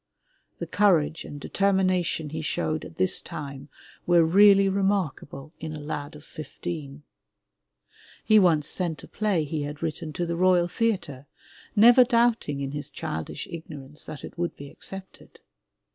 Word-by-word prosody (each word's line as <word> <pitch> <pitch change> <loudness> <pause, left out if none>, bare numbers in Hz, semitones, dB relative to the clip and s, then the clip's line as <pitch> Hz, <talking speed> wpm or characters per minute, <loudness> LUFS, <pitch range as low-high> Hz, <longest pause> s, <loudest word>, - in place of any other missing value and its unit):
The - - -4
courage 165 -7 +2
and 145 - -8
determination 185 -4 0
he 160 0 -4
showed 155 0 -2
at 165 - -11
this 185 0 +2
time 140 -1 -8 0.4
were 175 -2 +5
really 195 +3 +6
remarkable 190 -7 -1
in 155 -1 -6
a - - -7
lad 145 0 -5
of 150 +1 -13
fifteen. 150 -2 -7 1.2
He 215 -1 +6
once 160 -6 +3
sent 165 -5 -2
a - - -10
play 205 -7 0
he 150 +1 -3
had 145 +2 -6
written 160 -1 -4
to 175 - -2
the 170 0 -2
Royal 180 0 +3
Theatre, 175 - -2 0.5
never 240 +4 +8
doubting 235 - +1
in 135 -1 -3
his 145 0 -4
childish 80 0 -5
ignorance 150 -3 -8
that 145 - -8
it - - -10
would 175 0 -2
be 140 0 -10
accepted. 190 0 -8
165 Hz, 150 wpm, -26 LUFS, 150-190 Hz, 1.2 s, never